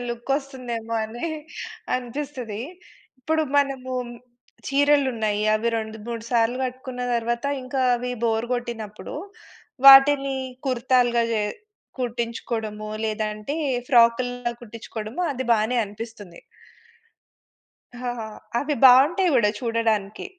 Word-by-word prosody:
Look 240 +2 -6
వస్తుందేమో 245 -5 -5
అని 235 +9 -5 0.7
అనిపిస్తది. 250 -3 -5 0.6
ఇప్పుడు 315 +5 +1 0.2
మనము 270 -2 -1 0.8
చీరలు 285 0 +3
ఉన్నాయి. 210 -2 -1
అవి 220 +2 0
రెండు 220 0 -6
మూడు 230 -1 -5
సార్లు 240 +1 +2
కట్టుకున్న 255 0 -5
తర్వాత 235 +1 -1 0.2
ఇంకా 260 +1 -3 0.2
అవి 250 +1 -4
బోర్ 225 0 +1
కొట్టినప్పుడు 225 -4 -6 0.7
వాటిని 275 0 +8 0.3
కుర్తాలుగా 245 -2 +2
చే 215 -2 +1 0.6
కుట్టించుకోవడము 230 -3 -3 0.2
లేదంటే 215 +3 -3 0.3
ఫ్రాకులా 245 -1 +3
కుట్టించుకోవడము 230 +3 -6
అది 260 -1 -4
బానే 225 +2 +1
అనిపిస్తుంది. 205 -3 -10 1.6
హ! - - -9 0.2
హ! - - -4 0.4
అవి 290 +2 -1
బావుంటాయి 285 +9 +7
కూడా 220 -4 +4
చూడడానికి. 225 -4 -1
240 Hz, 100 wpm, -24 LUFS, 220-260 Hz, 1.6 s, వాటిని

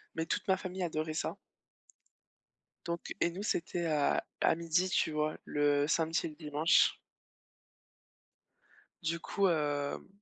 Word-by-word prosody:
mais 160 - -1
toute - - -2
ma 190 -1 +4
famille 185 0 -4
adorait 155 -2 -2
ça - - -2 1.5
donc, 170 0 -4
et - - +4
nous 190 +4 -6
c'était 175 -4 -1
à 150 -3 +2 0.2
à - - +4
12:00, 170 +2 +1
tu 160 - +1
vois? 155 0 -1
Le 145 0 +2
samedi 165 +1 +1
et - - -2
le 150 - -12
dimanche. 150 +1 +3 2.1
Du 170 +1 -1
coup, 200 +3 +1
hem, 145 -3 -1
160 Hz, 135 wpm, -32 LUFS, 150-175 Hz, 2.1 s, ma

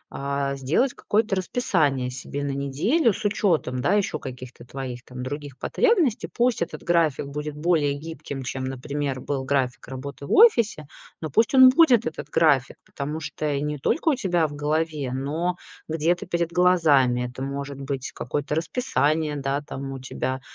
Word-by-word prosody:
а, 140 0 -2
сделать 155 - +1
какое-то 215 -1 0
расписание 160 - 0
себе 135 +2 -5
на 140 - -1
неделю 155 - +1
с 210 - -7
учётом, 165 -11 +1
да, 145 +9 +2
ещё 205 -2 0
каких-то 125 -2 -9
твоих 125 -1 -6
там 125 -1 -8
других 145 0 -6
потребностей. 360 - +1
Пусть 240 -3 +1
этот 170 - -4
график 165 -5 +2
будет 150 +1 -5
более 150 -2 +2
гибким, 145 -2 -7
чем, 130 +1 -4
например, 135 +1 -3
был 135 0 -2
график 130 -3 -1
работы 140 +2 -7
в - - -7
офисе, 235 - +5 0.3
но 155 -2 -5
пусть 225 - +3
он 260 -1 +10
будет, 255 -5 +5
этот 150 -2 -5
график, 145 -5 +3
потому 150 +3 -5
что 150 -1 -3
и 140 - -1
не 150 0 -3
только 325 - +1
у - - +4
тебя 180 - +1
в 145 - -9
голове, 150 -2 -1
но 155 +7 -1 0.3
где-то 165 +3 0
перед 170 -1 -1
глазами. 155 -9 +4
Это 125 +1 -9
может 140 0 -5
быть 135 -1 -4
какое-то 145 +4 -3
расписание, 155 - 0
да, 140 0 -1
там 135 -2 -6
у - - -5
тебя 130 0 -3
145 Hz, 165 wpm, -24 LUFS, 135-175 Hz, 0.3 s, он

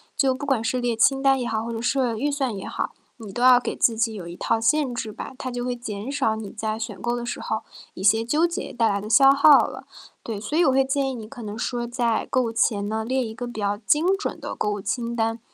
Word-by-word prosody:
就 265 -2 +2
不 270 +3 -6
管 260 -5 +1
是 250 +3 0
列 245 -2 0
清 270 +4 +3
单 270 -1 +4
也 250 - -3
好， 220 -1 -2
或 235 - -4
者 225 - -4
设 245 -2 +1
预 275 +7 -1
算 270 -6 -1
也 195 - -6
好， - - -3 0.3
你 215 -4 -10
都 240 - -4
要 250 -1 +7
给 - - -4
自 230 -2 +2
己 225 0 +1
有 190 -5 -7
一 175 - -9
套 225 - 0
限 275 +2 +2
制 225 -3 -4
吧。 235 - -8
它 255 - -4
就 245 0 -4
会 250 0 -1
减 220 0 -6
少 270 -6 0
你 215 -2 -7
在 220 0 -3
选 225 -4 -6
购 240 0 -1
的 240 0 -4
时 240 - -4
候 220 - -3 0.3
一 190 - -7
些 220 +3 +4
纠 300 +8 +2
结 340 - -5
带 230 -1 +1
来 200 -2 0
的 215 - -7
消 270 +3 +7
耗 280 +1 +7
了。 - - -9 0.4
对， 220 -3 -5
所 220 +9 -3
以 345 - +5
我 270 - +4
会 265 0 +3
建 270 0 0
议 260 - -4
你 220 -3 -8
可 245 0 -10
能 210 0 -6
说 240 0 -2
在 240 -2 0
购 255 - +2
物 230 - -2
前 205 -3 +1
呢， 220 +1 -2
列 255 +2 0
一 220 - -6
个 245 +1 -6
比 240 -3 -7
较 205 0 0
精 300 - +2
准 410 - -4
的 - - -6
购 210 - -1
物 205 - -3
清 230 +4 -3
单。 225 0 0
235 Hz, 300 characters per minute, -24 LUFS, 220-265 Hz, 0.4 s, 要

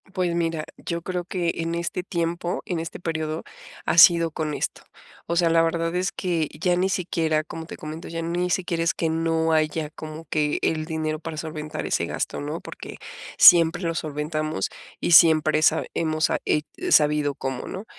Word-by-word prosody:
Pues 180 -2 0
mira, 165 -2 -1
yo 170 -1 -4
creo 180 -1 -3
que 175 -3 -1
en 165 0 -2
este 170 +1 -2
tiempo, 170 0 -2
en 175 -3 -2
este 165 +1 -6
periodo 160 -2 -3 0.4
ha - - 0
sido 170 -2 +7
con 155 -2 -3
esto, - - -3 0.5
o 170 - -1
sea, 170 -1 +3
la 165 0 +5
verdad 165 +1 0
es 185 +2 0
que, 170 -5 -1
ya 180 0 +2
ni 185 +2 +1
siquiera 160 -4 0
como 160 +1 -8
te - - -8
comento, 155 +2 -7
ya 165 0 -4
ni 175 +2 -1
siquiera 175 -2 -1
es 170 - +1
que 165 - -1
no 160 0 +1
haya, 155 0 0
como 155 +1 -9
que 150 0 0
el 155 -1 0
dinero 155 -1 -3
para 165 -1 -7
solventar 155 -1 -5
ese - - 0
gasto, - - -3
¿no?, 150 +3 -4
porque, - - -9 0.4
siempre 175 0 +7
lo 165 0 0
solventamos, 155 - -3 0.3
y - - -1
siempre 155 -2 +6
sa 160 +1 +3
hemos 155 -1 0
sa - - 0
he 150 - +1 0.3
sabido 150 -2 +3
cómo, 130 -1 -4
¿no?, 195 +4 -6
165 Hz, 185 wpm, -24 LUFS, 155-170 Hz, 0.5 s, sido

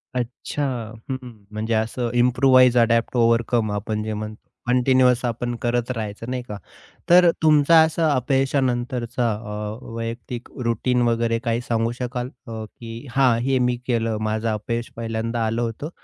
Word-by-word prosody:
अच्छा! 125 +4 -3 0.5
हं, 130 - -1
हं. 125 - -8 0.2
म्हणजे 110 +2 -2
असं 115 +2 -1
इम्प्रूवाइज, 125 0 +5
अडॅप्ट, 115 +1 +2
ओव्हरकम 115 -1 +2
आपण 105 +1 -2
जे 110 0 -3
म्हणतो 105 +1 -7 0.2
कंटिन्युअस 125 0 +3
आपण 120 +1 -2
करत 120 0 0
राहायचं 110 -1 -5
नाही 125 0 -2
का. 105 - -6 0.5
तर 175 0 +7
तुमचा 155 +1 +6
असा 160 0 +1
अपयशानंतरचा 125 -2 0
अ, 105 0 -5 0.2
वैयक्तिक 115 +1 -5 0.2
रूटीन 120 +2 +1
वगैरे 115 0 +1
काही 115 0 0
सांगू 115 0 +1
शकाल? 125 0 -3 0.2
अ, 110 -1 -5
की 115 +3 -10
हां, 125 -2 +3
हे 135 +2 +1
मी 125 0 +2
केलं. 115 -3 0
माझं 110 +1 -1
अपयश 115 +2 -3
पहिल्यांदा 115 0 -2
आलं 115 +2 -1
होतं 120 +6 -3
120 Hz, 145 wpm, -23 LUFS, 115-125 Hz, 0.5 s, तर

